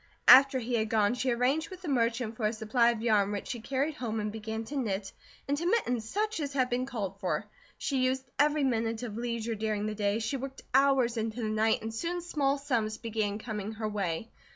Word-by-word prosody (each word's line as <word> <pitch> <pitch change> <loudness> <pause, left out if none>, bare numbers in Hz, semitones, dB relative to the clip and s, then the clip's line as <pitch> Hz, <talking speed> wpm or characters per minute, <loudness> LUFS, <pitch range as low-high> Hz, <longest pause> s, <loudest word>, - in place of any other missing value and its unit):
After 270 0 +9
he 245 0 -3
had 220 -2 +1
gone, 215 -1 +3
she 255 +1 -1
arranged 250 +6 +1
with 370 -1 -10
the - - -5
merchant 235 -3 0
for 220 -2 0
a 215 - -1
supply 230 +2 +2
of 230 -2 -2
yarn 210 -3 +3
which 205 -1 -4
she 240 - -3
carried 270 +6 -1
home 230 -6 -3
and 210 0 -2
began 220 +1 -4
to 280 +6 -7
knit 205 -7 -2 0.4
into 290 +5 0
mittens 245 - 0
such 430 -1 -1
as 285 -2 -3
had 255 -2 +1
been 250 +1 0
called 200 -7 -4
for. - - -1 0.3
She 265 -3 0
used 260 +1 -1
every 295 0 +3
minute 230 -2 0
of 220 -4 -5
leisure 235 -1 -2
during 215 -1 -1
the 215 - -2
day, 205 0 0
she 225 +5 -2
worked 270 +1 -7
hours 265 -3 +4
into 225 +1 -2
the 215 - -1
night, 220 +1 +2
and 225 0 -4
soon 340 +9 -2
small 285 -5 +1
sums 235 -6 -1
began 215 -3 -2
coming 215 -1 -5
her 215 0 -3
way. 200 -1 -3
235 Hz, 220 wpm, -30 LUFS, 215-270 Hz, 0.4 s, After